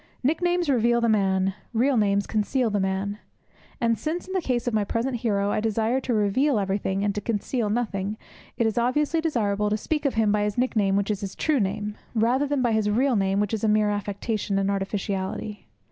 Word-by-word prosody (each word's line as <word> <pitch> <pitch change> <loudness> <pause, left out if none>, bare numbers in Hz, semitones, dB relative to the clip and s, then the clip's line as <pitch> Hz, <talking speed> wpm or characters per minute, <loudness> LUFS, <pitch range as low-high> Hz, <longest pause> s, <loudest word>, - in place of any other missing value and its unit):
Nicknames 350 +4 +1
reveal 235 -3 +3
the 235 - +1
man; 195 -3 +2 0.2
real 255 +4 +2
names 200 -2 +2
conceal 225 +2 0
the 205 - +1
man. 195 +2 -2 0.6
And 230 -1 +1
since, 325 +3 -3
in 375 - -7
the 375 - +1
case 245 -6 -1
of 245 - 0
my 215 -1 +2
present 240 +5 -1
hero, 205 -3 0
I - - 0
desire 225 +3 +1
to 250 - -1
reveal 220 +6 +2
everything 195 0 -1
and 205 -1 +1
to 205 - -3
conceal 225 +1 -1
nothing, 210 -2 -2 0.4
it 230 - +2
is 220 +1 +1
obviously 295 +7 +1
desirable 210 -9 0
to 210 - +1
speak 300 +7 -2
of 275 - +1
him 220 -2 +3
by 210 0 +2
his 210 +1 -1
nickname, 215 -6 +1
which 200 +1 +1
is 205 - -3
his 195 -1 -5
true 305 -4 +1
name, 210 +1 -2 0.2
rather 245 +6 +2
than 280 -2 0
by 240 - +2
his 220 -1 +1
real 250 +4 +2
name, 195 -1 +1
which 210 +1 -1
is 220 - -2
a - - +3
mere 210 0 +3
affectation 205 0 -2
and 195 0 +1
artificiality. 195 - -3
215 Hz, 210 wpm, -25 LUFS, 200-245 Hz, 0.6 s, reveal